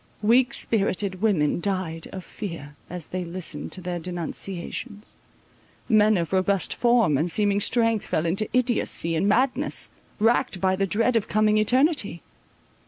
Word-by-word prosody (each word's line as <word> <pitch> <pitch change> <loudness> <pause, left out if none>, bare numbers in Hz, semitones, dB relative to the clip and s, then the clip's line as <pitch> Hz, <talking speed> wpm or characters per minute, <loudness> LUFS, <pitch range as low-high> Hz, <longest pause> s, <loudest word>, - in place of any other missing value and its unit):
Weak 245 +4 +4
spirited 195 -3 0
women 175 -9 +1
died 185 -5 -3
of 185 -2 -8
fear 165 -8 -8
as 175 -2 -7
they 185 0 -4
listened 170 -3 -5
to 185 - -2
their 175 -1 -4
denunciations; 180 +5 -5 0.7
men 215 -2 +4
of 170 +1 -3
robust 190 0 +1
form 230 - +2
and 165 +3 0
seeming 205 +2 +2
strength 230 -1 +2
fell 155 - -1
into 195 +6 0
idiotcy 235 -9 +1
and 195 +6 +1
madness, 250 +5 +1 0.3
racked 225 -1 +1
by 190 0 +1
the 195 +1 -1
dread 230 +5 +1
of 225 -2 +1
coming 215 0 +2
eternity. 250 - +1
200 Hz, 145 wpm, -24 LUFS, 175-220 Hz, 0.7 s, Weak